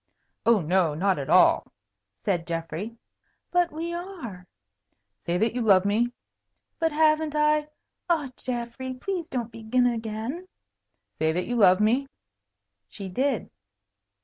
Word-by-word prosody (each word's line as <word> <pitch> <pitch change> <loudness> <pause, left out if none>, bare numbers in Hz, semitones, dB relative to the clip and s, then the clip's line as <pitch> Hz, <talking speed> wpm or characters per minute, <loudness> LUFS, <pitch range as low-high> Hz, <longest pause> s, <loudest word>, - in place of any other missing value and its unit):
"Oh, 230 -4 +5
no, 170 -1 +2
not 185 +1 +1
at 135 - -5
all," - - +5 0.5
said 175 -5 0
Geoffrey. 170 +7 -4 0.5
"But 355 -1 +2
we 330 +3 -4
are." 330 - -7 0.8
"Say 170 +1 +1
that 225 +4 +1
you 250 - -2
love 200 -4 +5
me." 225 +4 +2 0.7
"But 325 -1 +2
haven't 310 0 +2
I 300 0 +3 0.4
ah, 305 -6 +1
Geoffrey, 250 +1 -4
please 350 +4 -4
don't 240 -6 -3
begin 230 +3 +1
again." 230 +8 -3 0.7
"Say 160 0 +2
that 180 +2 -1
you 245 - -2
love 185 -5 +6
me." 240 +6 +2 0.8
She 195 - -8
did. 255 +4 -1
235 Hz, 130 wpm, -26 LUFS, 195-300 Hz, 0.8 s, love